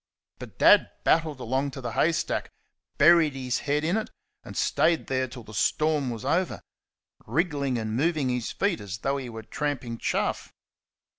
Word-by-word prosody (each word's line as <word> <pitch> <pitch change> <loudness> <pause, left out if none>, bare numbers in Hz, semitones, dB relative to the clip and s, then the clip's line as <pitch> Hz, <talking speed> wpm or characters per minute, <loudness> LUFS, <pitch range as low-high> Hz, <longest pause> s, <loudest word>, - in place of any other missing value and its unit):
But - - -10
Dad - - +6
battled 160 -4 +2
along 130 +3 -1
to 135 - -8
the 120 -2 -4
haystack, 160 +8 0 0.5
buried 165 -4 +5
his 130 -1 -2
head 150 +1 +2
in 170 +6 +1
it, 220 - -3 0.3
and - - -9
stayed 160 +3 +2
there 130 -1 -1
till 120 -1 -10
the 110 - -12
storm 150 +6 +1
was 115 0 -6
over 180 +6 0 0.6
wriggling 145 -6 0
and 110 -1 -3
moving 150 0 +1
his 125 -2 -2
feet 200 -3 -1
as 100 -1 -6
though 135 +5 -1
he 130 -3 -6
were 110 -1 -8
tramping 125 -1 -3
chaff. - - -2
135 Hz, 165 wpm, -26 LUFS, 120-155 Hz, 0.6 s, Dad